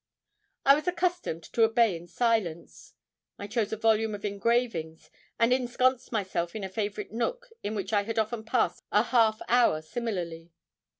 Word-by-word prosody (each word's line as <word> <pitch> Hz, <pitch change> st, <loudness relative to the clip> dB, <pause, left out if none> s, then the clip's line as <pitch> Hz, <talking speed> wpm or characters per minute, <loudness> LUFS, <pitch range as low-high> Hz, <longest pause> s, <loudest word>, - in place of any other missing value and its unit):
I 275 Hz, -, +8 dB
was 300 Hz, +3 st, -1 dB
accustomed 355 Hz, -, -1 dB
to 235 Hz, -, +1 dB
obey 225 Hz, -3 st, +4 dB
in 170 Hz, +1 st, -9 dB
silence. 190 Hz, -5 st, -2 dB, 0.4 s
I 200 Hz, -, -6 dB
chose 215 Hz, 0 st, -1 dB
a 220 Hz, -, -2 dB
volume 220 Hz, -1 st, +2 dB
of 205 Hz, -, -7 dB
engravings, 200 Hz, -7 st, -1 dB, 0.3 s
and 230 Hz, +2 st, +4 dB
ensconced 255 Hz, 0 st, +1 dB
myself 190 Hz, -5 st, -2 dB
in 215 Hz, -, -4 dB
a 190 Hz, -, -4 dB
favourite 210 Hz, +1 st, -4 dB
nook -, -, -3 dB
in 210 Hz, +2 st, -3 dB
which 205 Hz, +1 st, -4 dB
I 205 Hz, -, +4 dB
had 225 Hz, +2 st, -5 dB
often 220 Hz, +1 st, -1 dB
passed 225 Hz, +1 st, 0 dB
a 210 Hz, -, +4 dB
half 225 Hz, -3 st, +2 dB
hour 240 Hz, -10 st, +4 dB
similarly. 170 Hz, -5 st, -4 dB
220 Hz, 165 wpm, -28 LUFS, 200-240 Hz, 0.4 s, I